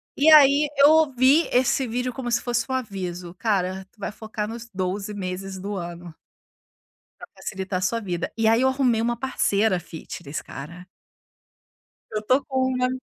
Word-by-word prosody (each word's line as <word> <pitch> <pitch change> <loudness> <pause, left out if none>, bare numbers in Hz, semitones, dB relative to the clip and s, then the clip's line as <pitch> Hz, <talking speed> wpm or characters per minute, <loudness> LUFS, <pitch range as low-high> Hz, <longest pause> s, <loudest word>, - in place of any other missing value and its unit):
E 310 +3 +5
aí, 290 0 +7
eu 285 +1 +7
ouvi 290 -1 +4
esse 255 +1 +2
vídeo 250 +2 -2
como 245 -1 -4
se - - +2
fosse 240 -2 -1
um 260 - -2
aviso, 185 -8 -4
cara, 190 -3 -1
tu 220 - -32
vai - - -4
focar 215 0 -5
nos 230 +1 -8
12 195 +2 -3
meses 190 0 -5
do 200 +2 -4
ano 175 -2 -7 1.1
pra - - -9
facilitar 190 -1 -4
sua 230 +5 0
vida. 180 -5 -4
E 225 -1 +2
aí 225 +3 +4
eu 265 - +4
arrumei 260 -4 +1
uma 240 +1 0
parceira 220 -5 +1
fitness, 160 -3 -7
cara. 170 +6 -10 1.3
Eu 215 - -1
estou 255 +6 +2
com 260 -1 0
uma 250 0 +1
220 Hz, 165 wpm, -24 LUFS, 185-255 Hz, 1.3 s, aí